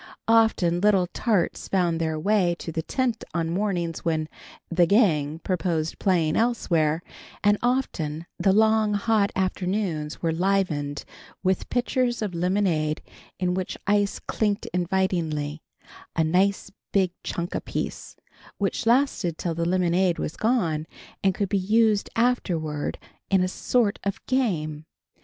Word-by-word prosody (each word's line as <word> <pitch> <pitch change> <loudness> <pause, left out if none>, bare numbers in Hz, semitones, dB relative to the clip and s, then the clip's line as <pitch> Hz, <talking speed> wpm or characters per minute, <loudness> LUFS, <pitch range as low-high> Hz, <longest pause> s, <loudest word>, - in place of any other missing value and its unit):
Often, 220 -7 +3
little 200 -3 +4
tarts 210 -8 0
found 175 -3 +1
their 160 -1 -1
way 185 -1 +2
to 165 - -6
the 160 - -2
tent 245 +5 -1
on 165 -1 0
mornings 175 -3 -1
when 160 -2 -1 0.4
"the 175 0 +3
gang" 160 -8 +3
proposed 165 -2 -2
playing 170 -6 +2
elsewhere, 170 -9 +1 0.4
and 205 0 +4
often 170 - -1
the 195 - +3
long 220 0 +3
hot 205 -1 +2
afternoons 185 -4 -1
were 165 - 0
livened 160 -5 0 0.4
with 190 -1 0
pitchers 245 -1 0
of 200 -4 -3
lemonade 170 -4 0 0.4
in 180 -1 +1
which 185 0 -3
ice 205 0 +2
clinked 205 -2 -1
invitingly; 170 -5 -1 0.5
a 165 - +3
nice 190 +5 +1 0.2
big 190 -3 +2
chunk 175 0 -3
apiece, - - -4 0.4
which 200 +3 -1
lasted 230 - +2
till 170 - -2
the 170 +1 -1
lemonade 180 -1 +2
was 155 - -4
gone, 170 -10 0 0.4
and 190 -2 +3
could 200 - -1
be 200 +1 +1
used 215 +1 +2
afterward 170 -11 0 0.3
in 190 -2 +3
a - - +1
sort 210 +3 0
of 200 -1 -2
game. 160 - -1
185 Hz, 135 wpm, -25 LUFS, 165-210 Hz, 0.5 s, little